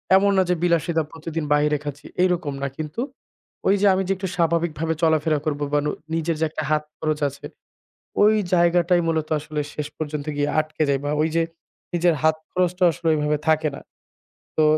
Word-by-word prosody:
এমন 200 +1 +5
না 190 - +5
যে 180 - +3
বিলাসিতা 170 -1 +2
প্রতিদিন 165 0 -5
বাহিরে 150 0 +3
খাচ্ছি 145 0 -7 0.2
এইরকম 175 -6 +1
না 140 - +1
কিন্তু, 155 +7 -4 0.7
ঐযে 200 +1 +3
আমি 190 +1 +1
যে - - 0
একটু 190 - -3
স্বাভাবিকভাবে 165 -2 +1
চলাফেরা 155 -1 +3
করব 145 -2 -1
বা 145 - +4
নু 150 - +1 0.2
নিজের 165 0 0
যে 160 - +2
একটা 155 0 -4
হাত 150 0 +2 0.2
খরচ 155 -1 -1
আছে। 140 - -12 0.8
ওই 215 +1 +6 0.2
জায়গাটাই 175 0 +4
মূলত 160 -1 0
আসলে 150 0 -4
শেষ 150 -1 -3
পর্যন্ত 150 -2 -4
গিয়ে 145 0 0
আটকে 155 0 -1
যাই 140 -1 +2
বা 145 - 0
ঐযে 160 +1 +1 0.5
নিজের 175 0 +3
হাত 160 0 +4 0.2
খরচটা 180 0 0
আসলে 170 +1 -5
ওইভাবে 150 0 +1
থাকে 155 -1 +3
না। - - -9 0.8
তো, 155 - +5
160 Hz, 180 wpm, -23 LUFS, 150-170 Hz, 0.8 s, ওই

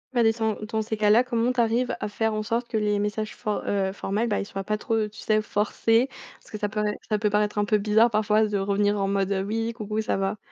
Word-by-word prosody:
Ah, 235 - +4
des 225 - +5
sans 220 -1 -1 0.2
dans 220 -1 0
ces 220 0 -3
cas-là, 215 +3 +4
comment 240 0 +1
t'arrives 240 0 +1
à - - -2
faire 220 +1 -1
en 215 - -1
sorte 230 +3 -2
que 220 - -1
les 210 -1 +1
messages 210 +1 -2
for 210 -1 -2
heu, 195 -1 0
formels, 205 +4 -2
bah, 205 - 0
ils - - -3
soient 195 -1 -5
pas 215 +1 -1
trop, 220 0 0
tu 210 - -14
sais, 215 0 +1
forcés? 225 +4 +1 0.3
Parce - - -21
que 215 - -6
ça 205 0 -2
pourrait- 210 -1 -1
ça 210 -1 +1
peut 210 -1 +1
paraître 210 0 0
un 205 - +2
peu 215 0 +3
bizarre 215 +3 +4
parfois 215 0 +2
de 205 -1 -1
revenir 205 +1 +1
en 195 0 0
mode, 195 0 0
heu: 190 0 -1
«Oui, 225 +2 -2
coucou 215 -1 -3
ça - - -1
va?» 195 +2 -1
215 Hz, 265 wpm, -25 LUFS, 205-225 Hz, 0.3 s, des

